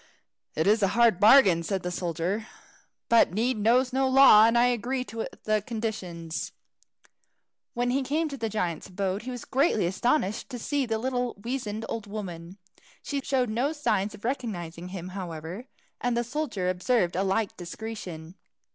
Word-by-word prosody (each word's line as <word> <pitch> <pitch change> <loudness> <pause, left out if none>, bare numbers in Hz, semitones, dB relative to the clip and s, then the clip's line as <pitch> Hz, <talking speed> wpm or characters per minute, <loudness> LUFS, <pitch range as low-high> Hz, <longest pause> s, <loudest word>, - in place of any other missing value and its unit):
"It 160 - +1
is 215 +2 +4
a 195 - +4
hard 235 -6 +5
bargain," 205 -6 +7
said 190 +2 -2
the 180 - -3
soldier, 180 +5 -2 0.6
"but 230 -6 +4
need 240 +3 +1
knows 250 +4 +3
no 265 0 +2
law, 260 -5 +8
and 230 +1 +2
I 240 - +5
agree 245 +2 0
to 225 -2 -5 0.2
the 215 -1 +1
conditions." 190 -7 -5 1.2
When 245 +1 0
he 270 +2 +1
came 295 +5 0
into 300 -3 -3
the 230 -4 -3
giant's 180 -6 -2
abode, 195 +1 -2
he 250 - -7
was 245 -2 -6
greatly 265 - +2
astonished 210 - 0
to 250 - -5
see 275 +2 -1
the 225 -1 0
little 250 +1 -2
weazened 225 -1 -4
old 225 -2 -5
woman. 185 -4 -7 0.5
She 280 -1 -3
showed 255 -5 0
no 255 +7 0
sign 210 -10 0
of 205 - -12
recognizing 180 -10 -4
him, 180 -1 -7
however, 180 +4 -7 0.3
and 245 -1 0
the 240 - +1
soldier 240 -7 -3
observed 185 0 +1
a 185 - +1
like 195 +2 0
discretion. 175 -3 -7
220 Hz, 165 wpm, -27 LUFS, 185-245 Hz, 1.2 s, law